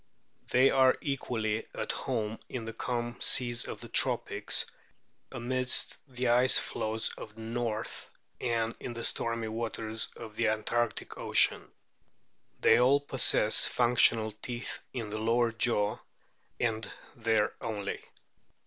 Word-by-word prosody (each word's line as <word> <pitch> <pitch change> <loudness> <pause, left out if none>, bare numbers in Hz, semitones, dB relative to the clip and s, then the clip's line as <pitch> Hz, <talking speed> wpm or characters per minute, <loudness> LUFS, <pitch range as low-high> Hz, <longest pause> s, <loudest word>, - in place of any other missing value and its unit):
They 130 +2 +4
are 130 -1 +4
equally 115 -6 -3
at - - -3
home 110 -4 -3
in 120 -3 -5
the 115 - -6
calm 120 +1 -4
seas 120 -1 +2
of - - -7
the - - -8
tropics, - - +2 0.7
amidst 125 +2 +3
the 125 -2 -2
ice 125 +2 +4
floes 110 +1 -2
of 110 - -10
the 115 - -11
north, 115 -1 -4 0.3
and 115 -2 -1
in 120 - -6
the 115 - -4
stormy 115 -1 -1
waters 110 0 -1
of 110 -2 -10
the 115 - +1
antarctic 110 +1 -2
ocean. - - +3 0.9
They 115 - +5
all 130 +3 +4
possess 130 -6 +3
functional 115 -2 +3
teeth 120 +3 -6
in 115 -5 -5
the 110 - -3
lower 115 +1 +1
jaw, 115 -2 0 0.6
and 110 -2 -2 0.2
there 110 -2 +1
only. 105 -3 -4
115 Hz, 130 wpm, -29 LUFS, 110-120 Hz, 0.9 s, They